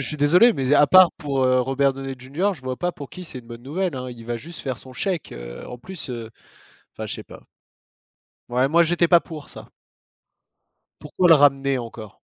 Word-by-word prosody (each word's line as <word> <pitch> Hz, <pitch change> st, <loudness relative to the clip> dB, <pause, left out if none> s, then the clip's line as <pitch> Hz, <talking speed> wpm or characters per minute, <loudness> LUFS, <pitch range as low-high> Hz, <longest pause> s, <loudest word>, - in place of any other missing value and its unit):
suis 150 Hz, +3 st, -4 dB
désolé 175 Hz, +12 st, +5 dB
mais 135 Hz, -6 st, -1 dB
à 145 Hz, -, +6 dB
part 185 Hz, +1 st, +7 dB
pour, 135 Hz, -3 st, -2 dB
heu, 130 Hz, 0 st, +3 dB
Robert 135 Hz, +2 st, +1 dB
Downey 135 Hz, 0 st, -6 dB
Junior, 155 Hz, +11 st, -1 dB
je 145 Hz, -, -16 dB
vois 130 Hz, 0 st, -4 dB
pas 175 Hz, +5 st, -1 dB
pour 140 Hz, -4 st, -10 dB
qui 180 Hz, -, -9 dB
c'est 145 Hz, -6 st, -6 dB
une 120 Hz, -, -14 dB
bonne 120 Hz, 0 st, -10 dB
nouvelle, 170 Hz, +5 st, -2 dB
hein. 130 Hz, -1 st, -5 dB
Il 115 Hz, -2 st, -11 dB
va 120 Hz, +1 st, -3 dB
juste 165 Hz, +8 st, -10 dB
faire 130 Hz, -4 st, -4 dB
son 130 Hz, -, -12 dB
chèque, 180 Hz, +4 st, -3 dB
heu, -, -, -9 dB
en 125 Hz, -, -8 dB
plus, 180 Hz, +3 st, -8 dB
heu, 115 Hz, -2 st, -6 dB, 0.6 s
enfin -, -, -6 dB
je -, -, -5 dB
sais -, -, -8 dB
pas. -, -, -14 dB, 1.1 s
Ouais 125 Hz, +2 st, +1 dB
moi 170 Hz, +4 st, +4 dB
j'étais 170 Hz, 0 st, +2 dB
pas 170 Hz, -2 st, +6 dB
pour 155 Hz, -3 st, -10 dB
ça. -, -, -11 dB, 1.3 s
Pourquoi 180 Hz, -, +1 dB
le -, -, +10 dB
ramener 140 Hz, -2 st, +3 dB
encore? 115 Hz, -3 st, -9 dB
135 Hz, 215 wpm, -23 LUFS, 125-170 Hz, 1.3 s, le